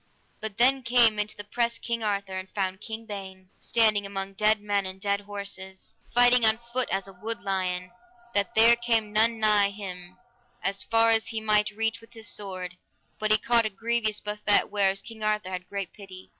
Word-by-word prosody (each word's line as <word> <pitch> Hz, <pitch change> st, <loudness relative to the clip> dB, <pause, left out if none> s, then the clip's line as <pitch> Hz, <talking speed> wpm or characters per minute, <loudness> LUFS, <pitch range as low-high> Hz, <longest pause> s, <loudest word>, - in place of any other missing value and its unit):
By 220 Hz, -, -1 dB
then 250 Hz, +6 st, +3 dB
came 230 Hz, -3 st, +4 dB
into 210 Hz, +1 st, -2 dB
the 205 Hz, -, -5 dB
press 235 Hz, +3 st, -1 dB
King 235 Hz, -1 st, -3 dB
Arthur, 200 Hz, -3 st, -2 dB
and 185 Hz, 0 st, -6 dB
found 190 Hz, -1 st, -3 dB
King 225 Hz, 0 st, -6 dB
Ban 190 Hz, -3 st, -9 dB
standing 215 Hz, -3 st, +2 dB
among 195 Hz, 0 st, -5 dB
dead 215 Hz, +2 st, +3 dB
men 205 Hz, -1 st, 0 dB
and 185 Hz, 0 st, -8 dB
dead 200 Hz, 0 st, -1 dB
horses, 200 Hz, -2 st, -8 dB, 0.2 s
fighting 245 Hz, 0 st, +5 dB
on 220 Hz, 0 st, +5 dB, 0.2 s
foot 255 Hz, 0 st, +2 dB
as 195 Hz, 0 st, -2 dB
a 195 Hz, -, -12 dB
wood 220 Hz, +5 st, -3 dB
lion, 185 Hz, -2 st, -2 dB, 0.4 s
that 200 Hz, 0 st, 0 dB
there 230 Hz, +2 st, +7 dB
came 230 Hz, -3 st, 0 dB
none 225 Hz, +1 st, +3 dB
nigh 210 Hz, -2 st, +4 dB
him, 185 Hz, -3 st, -8 dB, 0.5 s
as 195 Hz, 0 st, -1 dB
far 230 Hz, 0 st, +3 dB
as 225 Hz, 0 st, +2 dB
he 225 Hz, -, -3 dB
might 210 Hz, -1 st, +2 dB
reach 225 Hz, +2 st, -1 dB
with 230 Hz, +1 st, -18 dB
his 225 Hz, -1 st, -6 dB
sword, 185 Hz, -3 st, -6 dB, 0.4 s
but 215 Hz, -, 0 dB
he 215 Hz, -, +6 dB
caught 235 Hz, +2 st, +3 dB
a -, -, -5 dB
grievous 220 Hz, +1 st, 0 dB
buffet; 210 Hz, -1 st, +1 dB
whereof 195 Hz, -1 st, +1 dB
King 225 Hz, -1 st, -11 dB
Arthur 210 Hz, -3 st, -1 dB
had 180 Hz, -1 st, -6 dB
great 200 Hz, -2 st, -5 dB
pity. 190 Hz, -2 st, -12 dB
210 Hz, 195 wpm, -27 LUFS, 195-225 Hz, 0.5 s, there